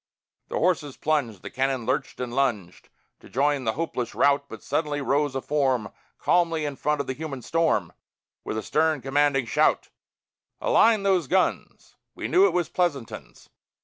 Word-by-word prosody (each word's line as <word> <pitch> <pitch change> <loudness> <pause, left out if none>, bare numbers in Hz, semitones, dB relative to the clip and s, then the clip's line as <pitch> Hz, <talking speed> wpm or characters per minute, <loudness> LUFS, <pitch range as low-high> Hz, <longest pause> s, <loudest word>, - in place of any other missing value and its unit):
The - - -3
horses 155 -6 0
plunged, 135 -11 -1
The - - -7
cannon 130 -2 -1
lurched - - -2
and 125 -1 -4
lunged, 115 -10 -2 0.3
To - - -16
join 140 0 +1
the 110 - +1
hopeless 130 -6 -3
rout. 140 0 +3
But 110 - -10
suddenly 145 0 -1
rose 140 +1 0
a 135 - -1
form 130 -7 0 0.3
Calmly 165 -3 +1
in 145 -1 -3
front 150 +1 0
of - - -5
the 130 - -3
human 140 -3 -6
storm, 160 - 0 0.5
With 110 - -4
a 110 - -3
stern 155 -2 +1
commanding 135 -1 +2
shout: - - +1 0.7
"Align 220 -3 +4
those 185 -6 +2
guns!" 185 +4 -1 0.2
(We - - -4
knew 380 +2 +5
it - - 0
was 175 -2 0
Pleasanton's.) 145 -10 -3
140 Hz, 165 wpm, -25 LUFS, 130-160 Hz, 0.7 s, knew